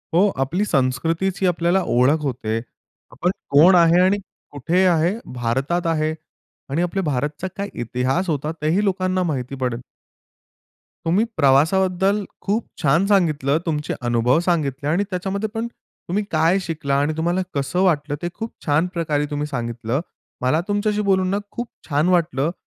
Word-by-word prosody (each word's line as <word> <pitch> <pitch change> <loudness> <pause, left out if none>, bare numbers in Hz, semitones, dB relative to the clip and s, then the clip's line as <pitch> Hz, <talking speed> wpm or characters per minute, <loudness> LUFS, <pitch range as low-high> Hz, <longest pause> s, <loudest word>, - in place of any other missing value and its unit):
हो, 200 +4 +5
आपली 180 +10 -1
संस्कृतीची 165 +6 0
आपल्याला 175 +2 +2
ओळख 130 +6 +3
होते. 115 -5 -2 0.5
आपण 170 +10 0 0.2
कोण 160 +7 +7
आहे 170 0 +5
आणि 190 +2 +3 0.3
कुठे 165 +7 +1
आहे, 170 0 +3 0.2
भारतात 135 +9 -1
आहे 155 -1 +1 0.6
आणि 155 +5 0
आपले 180 +2 -1
भारतचा 150 +2 -2
काय 200 +1 -3
इतिहास 130 - -1
होता. 150 0 -1
तेही 170 +7 +2
लोकांना 185 -1 0
माहिती 135 -5 -3
पडेल. 125 -2 -2 1.2
तुम्ही 185 +7 +3
प्रवासाबद्दल 185 +8 +3 0.2
खूप 210 +4 -1 0.2
छान 160 +6 +3
सांगितलं, 155 -8 +2
तुमचे 150 -3 -2
अनुभव 120 +3 +2
सांगितले 145 -4 0
आणि 175 +6 +2
त्याच्यामध्ये 195 +3 -2
पण 225 +1 -2
तुम्ही 205 -3 -6
काय 165 +4 +3
शिकला 155 -5 -2
आणि 145 +2 +1
तुम्हाला 175 +3 0
कसं 140 +6 -1
वाटलं, 150 -5 +1
ते 175 - -2
खूप 225 0 -6
छान 155 +4 +2
प्रकारे 150 -4 0
तुम्ही 145 +1 -2
सांगितलं. 120 0 -3 0.4
मला 145 +6 +2
तुमच्याशी 205 +1 0
बोलून 190 -1 +3
ना 200 - +1
खूप 240 0 -4 0.2
छान 150 +4 +2
वाटलं. 165 -4 +1
165 Hz, 145 wpm, -21 LUFS, 140-185 Hz, 1.2 s, कोण